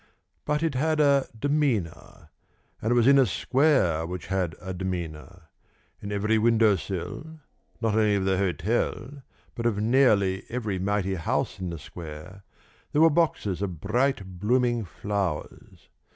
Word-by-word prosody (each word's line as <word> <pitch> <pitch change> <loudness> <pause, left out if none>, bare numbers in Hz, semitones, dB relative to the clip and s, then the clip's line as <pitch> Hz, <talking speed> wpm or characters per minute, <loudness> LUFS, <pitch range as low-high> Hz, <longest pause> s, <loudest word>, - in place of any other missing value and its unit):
But 150 +2 0
it 165 -3 0
had 155 +4 0
a 140 -2 +4
demeanour... 140 - -2 0.5
and 110 - -1
it - - +3
was 120 -2 +4
in 140 +1 +6
a 130 - +4
square 125 - +2
which 90 -1 -6
had 90 -4 -1
a 95 0 -6
demeanour.... 90 -2 -5 0.6
In 100 - -6
every 105 +2 +1
window 110 -2 +4
sill 100 - -6 0.4
not 115 -2 +1
only 105 -1 +3
of 95 -1 0
the 95 0 +1
hotel, 110 - -1 0.3
but 115 0 -2
of 110 -3 0
nearly 105 -5 +3
every 110 -6 -3
mighty 95 0 0
house 85 +1 -2
in 95 -1 -3
the 85 - -5
square 80 +5 -10 0.5
there 150 - +3
were 165 - +6
boxes 145 - 0
of 90 -6 -3
bright 100 - -1
blooming 120 +1 +1
flowers. 95 -3 -5
105 Hz, 150 wpm, -26 LUFS, 95-125 Hz, 0.6 s, in